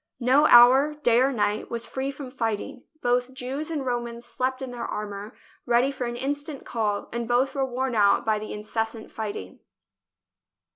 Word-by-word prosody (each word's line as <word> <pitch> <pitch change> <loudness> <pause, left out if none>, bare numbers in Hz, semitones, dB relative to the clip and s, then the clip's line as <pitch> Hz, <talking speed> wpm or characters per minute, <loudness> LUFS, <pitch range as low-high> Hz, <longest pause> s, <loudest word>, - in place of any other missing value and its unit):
No 265 +4 +4
hour, 260 +5 +7
day 235 0 +5
or 270 +1 +3
night, 210 -3 -1
was 235 0 -2
free 265 +1 -3
from 275 -2 -7
fighting; 245 +2 -3 0.2
both 245 +1 +1
Jews 270 +5 -4
and 300 -5 -3
Romans 240 -1 -3
slept 255 +1 -2
in 265 -2 -6
their 240 -1 -6
armour, 205 0 -6 0.3
ready 240 +3 +3
for 265 -2 -4
an 240 - -4
instant 285 +3 -4
call, 210 -3 -2
and 235 -1 -3
both 245 +3 +2
were 275 - 0
worn 260 0 -2
out 205 +1 +3
by 215 -1 +1
the 215 - -7
in 210 - -5
cessant 225 +1 -3
fighting. 205 - -6
245 Hz, 180 wpm, -25 LUFS, 225-265 Hz, 0.3 s, hour